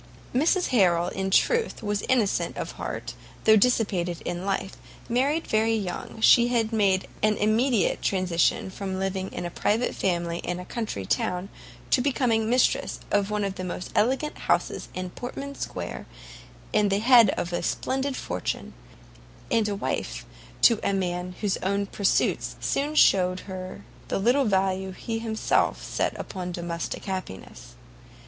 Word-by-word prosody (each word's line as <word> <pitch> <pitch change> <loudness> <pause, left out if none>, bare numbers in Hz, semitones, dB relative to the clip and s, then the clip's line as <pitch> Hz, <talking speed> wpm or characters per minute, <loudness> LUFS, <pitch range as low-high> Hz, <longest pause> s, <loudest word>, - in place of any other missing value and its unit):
Mrs 330 +8 +2
Harrel, 180 -7 +3
in 190 0 -3
truth, 460 - +2
was 205 -1 -1
innocent 235 -6 +1
of - - -4
heart, - - -5 0.3
though 220 - +7
dissipated 200 -7 +2
in 175 +2 -3
life; 195 0 -2 0.3
married 275 +7 +1
very 220 +1 +2
young, 200 +1 -5
she 235 +1 +7
had 230 -2 0
made 195 -3 +2
an 215 0 +2
immediate 220 0 +2
transition 185 -1 +1
from 190 -1 -4
living 190 0 -2
in - - -5
a 175 - -4
private 220 +7 0
family 170 -2 -1
and 175 0 -3
a 180 - -7
country 210 - -4
town, 180 - -1 0.4
to 255 - +4
becoming 245 -5 +1
mistress 250 +2 +2
of 205 0 +2
one 210 -1 -1
of 195 -1 -1
the 185 - -6
most 180 0 -5
elegant 265 +8 +1
houses - - 0
in 185 -1 -4
Portman 275 +5 -6
square, - - -6 0.7
at 205 -1 +3
the 195 - +2
head 230 0 +6
of 175 - -3
a 175 - 0
splendid 265 +1 -1
fortune, 90 -6 -4 0.8
and 225 -2 +3
wife - - -3 0.4
to 230 -3 +6
a 200 - 0
man 180 -1 -2
whose 205 -3 0
own 200 +2 -1
pursuits 200 0 0
soon 295 +2 -1
showed 185 -8 +4
her 185 -1 -7 0.2
the - - -1
little 245 +7 +3
value 190 -2 0
he 225 +4 -4
himself 220 -1 0
set - - -2
upon 180 -2 -5
domestic 170 -1 -4
happiness. 95 - -7
200 Hz, 150 wpm, -26 LUFS, 185-230 Hz, 0.8 s, though